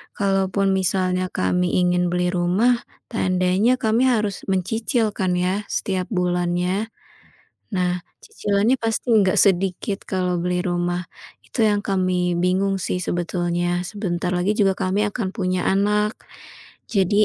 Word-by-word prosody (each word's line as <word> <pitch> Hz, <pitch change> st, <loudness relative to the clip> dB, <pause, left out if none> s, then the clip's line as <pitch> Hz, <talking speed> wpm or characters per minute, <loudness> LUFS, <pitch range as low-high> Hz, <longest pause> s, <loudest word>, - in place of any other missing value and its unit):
Kalaupun 195 Hz, 0 st, +1 dB
misalnya 185 Hz, -1 st, 0 dB
kami 180 Hz, 0 st, +1 dB
ingin 180 Hz, 0 st, +2 dB
beli 180 Hz, 0 st, +1 dB
rumah, 195 Hz, +8 st, +2 dB, 0.3 s
tandanya 185 Hz, +2 st, +2 dB
kami 225 Hz, +3 st, +2 dB
harus 215 Hz, -6 st, 0 dB
mencicil 220 Hz, +4 st, 0 dB
kan 185 Hz, -1 st, 0 dB
ya 185 Hz, +3 st, -1 dB
setiap 185 Hz, -2 st, -1 dB
bulannya? 180 Hz, +2 st, 0 dB, 0.9 s
Nah, 180 Hz, -1 st, 0 dB, 0.2 s
cicilannya 220 Hz, -, +1 dB
pasti 225 Hz, +2 st, -2 dB
nggak 190 Hz, -3 st, +3 dB
sedikit 195 Hz, +1 st, +1 dB
kalau 180 Hz, -2 st, -1 dB
beli 180 Hz, 0 st, 0 dB
rumah. 175 Hz, -1 st, -1 dB, 0.4 s
Itu 235 Hz, -, -2 dB
yang 205 Hz, -1 st, +2 dB
kami 185 Hz, -2 st, 0 dB
bingung 190 Hz, +2 st, +1 dB
sih, 180 Hz, -, -1 dB
sebetulnya. 175 Hz, 0 st, -1 dB
Sebentar 180 Hz, -3 st, -3 dB
lagi 180 Hz, +3 st, +1 dB
juga 195 Hz, -2 st, +3 dB
kami 190 Hz, +3 st, 0 dB
akan 205 Hz, -2 st, -3 dB
punya 185 Hz, -4 st, -1 dB
anak, 210 Hz, +2 st, +2 dB, 0.8 s
jadi 205 Hz, 0 st, +3 dB
185 Hz, 125 wpm, -22 LUFS, 180-205 Hz, 0.9 s, nggak